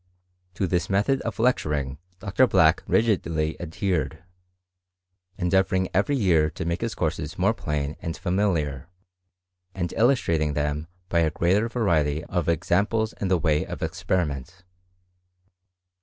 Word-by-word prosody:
To 95 - 0
this 90 0 -1
method 105 +8 +2
of 115 - -4
lecturing 75 - 0 0.2
Dr.Black 100 -5 +3
rigidly 85 -9 +1
adhered, 80 -4 -2 1.1
endeavouring 95 +1 +1
every 100 +10 +2
year 85 - +3
to 80 - -6
make 85 +1 -2
his 115 -1 -2
courses 80 -2 -2
more 100 +5 +3
plain 75 -6 -3
and 80 - -4
familiar, 85 -8 -1 0.9
and 85 -3 -3
illustrating 85 - +2
them 75 +1 -1 0.2
by 85 - +1
a 80 -1 +3
greater 95 +8 +1
variety 80 -10 +1
of 90 -2 -2
examples 105 +7 +1
in 100 - 0
the 95 -1 +3
way 80 -3 +1
of - - -6
experiment. 85 0 -2
85 Hz, 125 wpm, -25 LUFS, 75-100 Hz, 1.1 s, Dr.Black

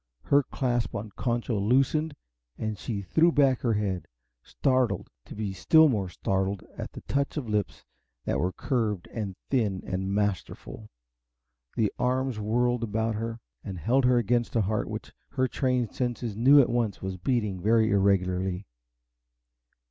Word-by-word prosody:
Her 140 0 +4
clasp 120 -3 -2
on 105 +1 -5
Concho 120 -3 -1
loosened 135 +8 +2 0.4
and 110 -1 -3
she 100 0 -4
threw 165 - +3
back 135 -5 +3
her 120 -3 +1
head, 100 -5 -2 0.3
startled 130 - 0
to - - -10
be 105 -2 -3
still 160 - +5
more 100 -7 -1
startled 95 +1 -1
at - - -7
the - - -8
touch 140 +2 -1
of 135 -6 -3
lips 105 -2 -2 0.4
that - - 0
were 90 +5 0
curved 110 -6 -1
and 100 -5 -4 0.2
thin 105 -8 +1
and 95 +1 -2
masterful. 105 +1 -3 0.9
The 105 -3 +1
arms 130 -2 0
whirled 120 +3 +1
her - - 0
about 115 +1 -2 0.2
and 95 -3 -6
held 125 - +2
her 125 0 +4
against 120 +1 +1
a 115 - +4
heart 105 +2 -1
which - - -6 0.2
her 130 0 +1
trained 125 -3 0
senses 120 -3 -2
knew 135 +6 +7
at 135 - +4
once 115 -6 -1
was 95 -1 -3
beating 105 -3 -1
very 110 +2 +3
irregularly. 95 -1 +1
110 Hz, 155 wpm, -27 LUFS, 100-125 Hz, 0.9 s, knew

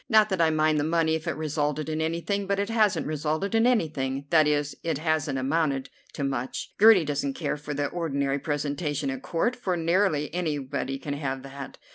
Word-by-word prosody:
Not 215 -2 +5
that 190 -3 0
I 165 - +5
mind 155 -1 +2
the - - +1
money 160 0 +2
if 160 -1 -3
it - - -1
resulted 150 -1 -1
in 155 0 -2
anything, 170 +5 -1
but 200 0 +1
it 200 +2 -1
hasn't 215 -3 +2
resulted 155 +6 -2
in 225 +1 +4
anything; 140 - 0
that 155 -2 +5
is, 145 -1 0
it 165 -4 -1
hasn't 155 -2 0
amounted 135 -1 0 0.2
to 145 - -4
much. 130 -2 -3
Gertie 210 -5 +7
doesn't 140 -2 -2
care - - -2
for 145 0 -6
the 145 0 0
ordinary 140 -4 -1
presentation 145 -1 -2
at 135 -1 -5
Court, 175 - 0
for 185 -8 -2
nearly 165 -3 +1
anybody 145 -5 -2
can 145 +1 -5
have 135 -2 -3
that. 135 0 -8
155 Hz, 195 wpm, -26 LUFS, 140-170 Hz, 0.2 s, Gertie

